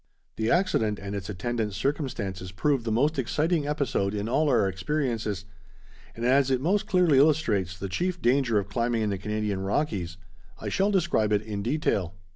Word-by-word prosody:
The 110 +1 -1
accident 115 - +2
and 100 0 -6
its 100 0 -5
attendant 105 +1 -2
circumstances 105 - -3
proved 130 +5 0
the 115 - -1
most 140 +7 +2
exciting 155 +4 0
episode 130 -9 0
in 105 +1 -2
all 150 +6 +2
our 100 - +3
experiences, 110 -2 -2 0.7
and 115 - -4
as 135 +2 +4
it 130 -1 +2
most 195 +9 +1
clearly 180 -9 +4
illustrates 115 - +2
the 100 - -4
chief 175 - -2
danger 125 -3 +2
of 100 - 0
climbing 115 -1 0
in 105 - 0
the 95 - -3
Canadian 105 -1 -2
Rockies, 95 - -2 0.4
I - - -4
shall 195 +2 +1
describe 170 - +1
it 105 0 +2
in 105 -2 -4
detail. 100 - -1
115 Hz, 175 wpm, -27 LUFS, 100-150 Hz, 0.7 s, as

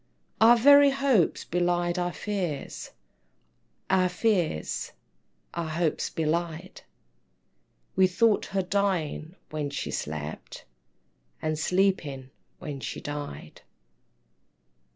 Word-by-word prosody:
Our 235 +2 +7
very 285 +3 +7
hopes 270 - +2
belied 175 0 0
our 175 0 -1
fears, 180 -8 -4 1.0
Our 185 -1 +3
fears 180 - -1 0.6
our 170 -1 -3
hopes 160 0 -1
belied 165 +3 -3 1.1
We 190 0 +5
thought 215 +3 +2
her 195 -1 -1
dying 180 -4 -1 0.2
when 150 -2 -2
she 140 - -4
slept, 75 0 -6 0.7
And 155 -1 -2
sleeping 155 -7 0 0.3
when 145 -2 -6
she - - -5
died. 145 - -7
175 Hz, 90 wpm, -27 LUFS, 155-195 Hz, 1.1 s, Our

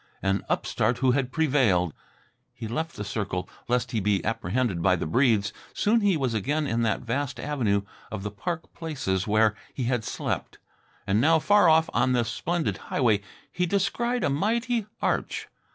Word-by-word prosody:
An 95 0 +1
upstart 115 +3 0
who 130 0 +3
had 130 -1 0
prevailed! 130 - +2 0.6
He 120 -3 -6
left 160 +9 -3
the 105 - -4
circle, 100 -3 -3 0.2
lest 125 0 0
he 115 - 0
be 100 -1 +1
apprehended 115 -3 -1
by 90 +1 +4
the 85 - -3
Breedes. 105 - +2 0.2
Soon 225 +2 +3
he 200 -5 +3
was 130 -5 -1
again 145 +8 0
in 115 -3 0
that 115 -3 +1
vast 130 +3 -2
avenue 115 -9 0 0.3
of 105 -3 -5
the 105 - -3
park 170 - -5
places 130 - -2
where 110 0 +4 0.2
he 130 - -2
had 120 -1 0
slept. - - -3 0.5
And 100 +3 +2
now, 160 +5 +5
far 205 +2 +5
off 160 0 +5
on 125 +2 +2
this 120 -2 +1
splendid 170 - -1
highway, 110 -6 +2 0.3
he 180 0 0
descried 235 +6 0
a - - +2
mighty 230 - 0 0.2
arch. - - -1
125 Hz, 170 wpm, -26 LUFS, 105-160 Hz, 0.6 s, now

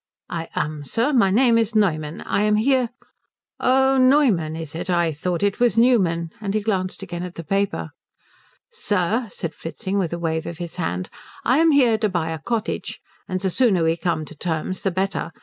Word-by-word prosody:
"I 165 -1 -4
am, 150 0 -2
sir. 230 - 0
My 235 -7 +4
name 230 +3 +4
is 225 0 -1
Neumann. 155 -7 +1
I - - 0
am 210 0 +3
here 250 +2 +2 0.4
" - - -70 0.2
"Oh, 265 +1 +3
Noyman, 250 - +3
is 160 -3 -7
it? 175 +3 -5
I 170 -2 +2
thought 170 +4 -2
it 200 -1 +1
was 240 -2 +2
Newman." 180 -9 +3
And 200 -1 -2
he 215 - +1
glanced 195 -3 -2
again 175 -2 -5
at 180 -1 -6
the 170 - -6
paper. 200 +5 -1 0.8
"Sir," 225 - 0
said 170 -3 -5
Fritzing, 190 +6 -4
with 175 -4 -1
a 170 - -2
wave 160 -1 -2
of 170 - -6
his 175 0 -7
hand, 90 - -3 0.3
"I 255 +5 +4
am 325 0 +5
here 250 -7 +4
to 215 -1 +1
buy 170 -3 -1
a 160 - -4
cottage, 225 +6 -3 0.3
and 185 0 -2
the 190 0 -1
sooner 200 -7 +3
we 165 0 +2
come 170 -2 -2
to 160 - -11
terms 165 +3 -3
the 195 - +1
better. 190 -1 -2
190 Hz, 200 wpm, -22 LUFS, 165-230 Hz, 0.8 s, am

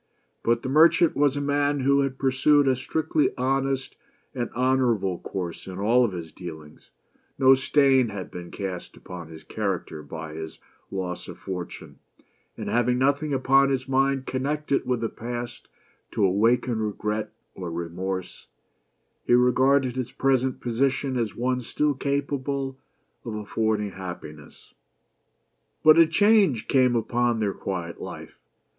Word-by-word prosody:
But 115 0 +1
the - - -3
merchant 165 +4 +5
was 145 -1 +2
a - - -1
man 145 0 +1
who 140 +1 +3
had 135 -1 -1
pursued 140 +2 +3
a 130 - +4
strictly 155 +3 0
honest 135 +1 -1 0.4
and 120 -3 -3
honorable 120 -8 +1
course 90 -3 -6
in 95 -1 -7
all 120 +5 +3
his 85 -4 -7
dealings; 80 -4 -10 0.5
no 130 0 +7
stain 135 -2 +3
had 100 -3 -7
been 90 -1 -8
cast 95 -3 -6
upon 90 -3 -9
his 80 -1 -12
character 95 -7 -3
by 80 +1 -8
his 80 0 -7 0.3
loss 90 -2 -4
of - - -9
fortune, 90 -2 -7 0.6
and - - -5
having 120 +1 +2
nothing 140 +3 +1
upon 135 +1 +4
his 130 -1 -1
mind 135 0 +1
connected 140 +1 -1
with 125 -2 0
the 115 - 0
past 120 +1 -6 0.5
to - - +2
awaken 115 +5 +2
regret 105 0 -2 0.2
or 90 -2 -6
remorse, 90 +2 -5 0.8
he - - +4
regarded 130 +1 +3
his 130 -2 -3
present 130 -1 +1
position 135 +2 0
as 115 -4 -1
one 125 +1 0
still 150 +5 0
capable 140 -1 -2 0.5
ot 110 -3 -5
affording 105 -1 -1
happiness. 85 -6 -10 1.1
But 155 +1 +7
a 165 - +7
change 195 - +3
came 130 -3 +3
upon 120 +1 +1
their 100 -3 0
quiet 85 -3 -5
life. - - -9
125 Hz, 140 wpm, -25 LUFS, 100-135 Hz, 1.1 s, no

